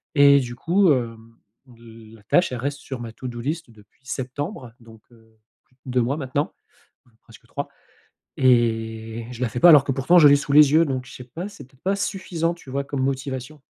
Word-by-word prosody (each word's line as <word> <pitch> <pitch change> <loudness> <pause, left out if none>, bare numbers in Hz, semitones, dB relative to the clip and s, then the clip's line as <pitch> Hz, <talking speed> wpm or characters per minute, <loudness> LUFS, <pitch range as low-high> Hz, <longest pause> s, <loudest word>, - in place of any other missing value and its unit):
et 140 -1 +7
du 120 -2 -5
coup, 175 +7 +2
hem, 115 -2 -5 0.4
heu, 115 -1 -15
la 105 - -19
tâche, 175 - +2
elle 125 - -3
reste 140 +3 -3
sur 130 -4 -7
ma 115 -1 -7
to-do 120 0 -7
list 150 0 -4
depuis 105 +3 -22
septembre 130 - -5
donc, 115 -1 -16
heu, 110 -1 -23 0.3
plus 135 -4 -35
2 125 -1 0
mois 130 +5 -1
maintenant. 140 0 -3 0.5
Même 120 -3 -29
presque - - -18
3 - - -5 0.7
et 115 -2 +1
je 125 - -9
la 125 - 0
fais 125 - -4
pas 175 - +7
alors 150 -4 +8
que 140 - -1
pourtant 140 +7 +4
je 150 - +8
l'ai 145 - +7
sous 140 - -5
les 150 -1 +7
yeux 165 +2 +5
donc 130 -3 -3
je 125 - -13
sais 125 - -10
pas, 165 +10 -7
c'est 200 - -13
peut-être 135 0 -28
pas 195 +2 +1
suffisant 185 -4 -2
tu 170 -5 -15
vois? 140 +1 -2
Comme 140 -1 -4
motivation. 135 +1 -4
130 Hz, 215 wpm, -23 LUFS, 115-145 Hz, 0.7 s, alors